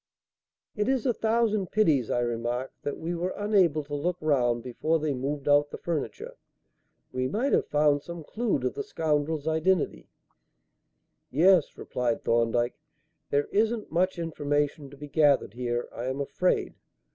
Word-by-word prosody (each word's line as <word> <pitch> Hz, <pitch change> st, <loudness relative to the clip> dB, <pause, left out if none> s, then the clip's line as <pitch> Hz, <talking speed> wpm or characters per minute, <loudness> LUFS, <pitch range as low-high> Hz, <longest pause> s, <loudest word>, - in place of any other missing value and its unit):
"It 210 Hz, +3 st, 0 dB
is 265 Hz, -2 st, +1 dB
a 250 Hz, -, +3 dB
thousand 220 Hz, -3 st, +1 dB
pities," 155 Hz, -, +2 dB
I 120 Hz, -, +1 dB
remarked, 120 Hz, +2 st, -2 dB
"that 145 Hz, -, -3 dB
we 165 Hz, +2 st, -3 dB
were 175 Hz, +2 st, -2 dB
unable 190 Hz, -7 st, +2 dB
to 145 Hz, +1 st, -10 dB
look 170 Hz, +5 st, -1 dB
round 120 Hz, -6 st, +1 dB
before 155 Hz, +6 st, 0 dB
they 155 Hz, -2 st, -1 dB
moved 140 Hz, +2 st, -3 dB
out 145 Hz, 0 st, +4 dB
the -, -, -7 dB
furniture. 155 Hz, -9 st, -4 dB, 0.7 s
We 130 Hz, 0 st, -1 dB
might 230 Hz, -, 0 dB
have -, -, +2 dB
found 145 Hz, -1 st, +3 dB
some 170 Hz, +1 st, -8 dB
clue 225 Hz, +5 st, -1 dB
to 125 Hz, 0 st, 0 dB
the -, -, -5 dB
scoundrel's 150 Hz, 0 st, -1 dB
identity." 160 Hz, +2 st, 0 dB, 1.2 s
"Yes," 170 Hz, +3 st, +4 dB
replied 120 Hz, -2 st, -2 dB
Thorndyke; 120 Hz, +1 st, +1 dB, 0.5 s
"there 145 Hz, 0 st, +2 dB
isn't 220 Hz, +1 st, 0 dB
much 185 Hz, +3 st, +1 dB
information 145 Hz, -3 st, -1 dB
to 140 Hz, -, -14 dB
be 145 Hz, +1 st, -8 dB
gathered 145 Hz, -7 st, +3 dB
here, 120 Hz, 0 st, -2 dB
I 120 Hz, -, -5 dB
am 130 Hz, +2 st, -2 dB
afraid. 180 Hz, +6 st, 0 dB
150 Hz, 155 wpm, -27 LUFS, 130-180 Hz, 1.2 s, out